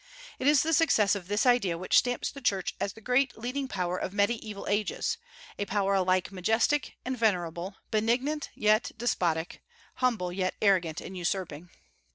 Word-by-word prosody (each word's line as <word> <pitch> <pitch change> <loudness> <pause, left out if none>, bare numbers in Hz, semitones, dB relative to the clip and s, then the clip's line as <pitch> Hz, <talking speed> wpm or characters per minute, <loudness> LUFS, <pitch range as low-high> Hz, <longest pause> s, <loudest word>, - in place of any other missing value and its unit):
It 265 - 0
is 290 -2 +5
the 325 +1 0
success 250 -11 +4
of 195 -4 -4
this 205 +4 +1
idea 230 -9 +3
which 185 +2 -1
stamps 245 -1 -2
the 275 - -10
Church 195 -7 0
as 200 - -2
the 220 - -14
great 250 +2 +1
leading 255 +4 -3
power 180 -5 -2
of 185 - -4
Mediaeval 210 0 -1
Ages, 215 - -1 0.4
a 205 - 0
power 200 0 +1
alike 185 -1 +1
majestic 225 +9 +1
and 260 +1 -2
venerable, 185 -4 -1 0.2
benignant 250 +8 0
yet 215 +2 +2
despotic, 175 -8 -1 0.4
humble 225 -9 0
yet 185 0 -1
arrogant 180 -6 +2
and 190 - -8
usurping. 175 -2 -3
205 Hz, 165 wpm, -28 LUFS, 185-245 Hz, 0.4 s, is